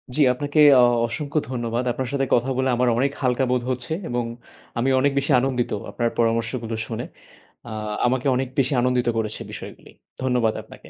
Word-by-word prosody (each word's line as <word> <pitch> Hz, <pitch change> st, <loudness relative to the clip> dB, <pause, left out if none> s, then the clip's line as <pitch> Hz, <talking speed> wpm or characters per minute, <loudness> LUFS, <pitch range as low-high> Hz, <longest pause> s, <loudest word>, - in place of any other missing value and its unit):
জি, 155 Hz, -, +2 dB
আপনাকে 145 Hz, +4 st, -1 dB, 0.2 s
অ -, -, +6 dB, 0.2 s
অসংখ্য 145 Hz, +6 st, -2 dB
ধন্যবাদ। 120 Hz, -1 st, -2 dB
আপনার 130 Hz, +1 st, -3 dB
সাথে 135 Hz, -1 st, +1 dB
কথা 125 Hz, +3 st, +2 dB
বলে 130 Hz, 0 st, +1 dB
আমার 125 Hz, +1 st, +1 dB
অনেক 140 Hz, +2 st, +2 dB
হালকা 130 Hz, +1 st, +1 dB
বোধ 125 Hz, -1 st, +1 dB
হচ্ছে 125 Hz, +4 st, -3 dB, 0.2 s
এবং 120 Hz, 0 st, -1 dB, 0.5 s
আমি 120 Hz, +3 st, +1 dB
অনেক 140 Hz, +1 st, +3 dB
বেশি 140 Hz, +2 st, +1 dB
আনন্দিত 125 Hz, -1 st, -1 dB, 0.2 s
আপনার 120 Hz, -1 st, 0 dB
পরামর্শগুলো 115 Hz, 0 st, 0 dB
শুনে। -, -, -4 dB, 0.6 s
আ -, -, -7 dB, 0.4 s
আমাকে 130 Hz, +2 st, 0 dB
অনেক 130 Hz, 0 st, -1 dB
বেশি 135 Hz, +2 st, +2 dB
আনন্দিত 125 Hz, 0 st, +1 dB
করেছে 110 Hz, -1 st, -3 dB
বিষয়গুলি। -, -, -9 dB, 0.3 s
ধন্যবাদ 125 Hz, -4 st, +1 dB
আপনাকে। -, -, -15 dB
125 Hz, 170 wpm, -23 LUFS, 120-135 Hz, 0.6 s, অ